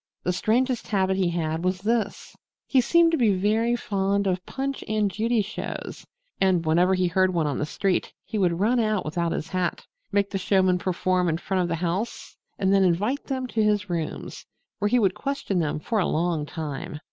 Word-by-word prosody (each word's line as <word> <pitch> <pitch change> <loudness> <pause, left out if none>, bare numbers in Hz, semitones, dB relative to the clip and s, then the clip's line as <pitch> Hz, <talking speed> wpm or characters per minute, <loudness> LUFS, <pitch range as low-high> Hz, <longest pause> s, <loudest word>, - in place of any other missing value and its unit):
The 180 - 0
strangest 240 +6 0
habit 190 -2 +1
he 185 -2 +1
had 165 -1 -2
was 185 0 0
this: 215 -1 -1 0.3
He 265 - +3
seemed 335 +6 +4
to 325 - +1
be 215 -5 +4
very 220 +5 +2
fond 200 -3 0
of 185 -1 0
Punch 275 0 -3
and 215 -2 +1
Judy 225 +2 +1
shows, 215 +4 -6 0.3
and 185 -3 +2
whenever 175 +4 +3
he 185 0 +1
heard 185 +1 +2
one 170 -3 0
on 145 -3 -1
the 150 - -1
street 190 +3 -1
he 220 - -3
would 175 -3 +1
run 235 +5 +3
out 215 -3 0
without 170 +2 -1
his 155 - -3
hat, 185 -2 -2 0.3
make 200 0 +1
the 195 - -1
showmen 185 -1 +2
perform 180 0 0
in 160 - 0
front 185 +2 -1
of 175 - 0
the 165 - -1
house 190 +7 -3 0.2
and 195 -1 +2
then 195 -1 +5
invite 200 +10 +1
them 260 -2 -2
to 225 - 0
his 210 -2 +1
rooms, 165 -3 -4 0.4
where 205 +1 +1
he 250 - +3
would 195 -6 +3
question 275 -4 -2
them 150 -2 -1
for 225 +6 -1
a 185 - +1
long 165 -2 0
time. 150 -2 -5
190 Hz, 205 wpm, -25 LUFS, 175-215 Hz, 0.4 s, then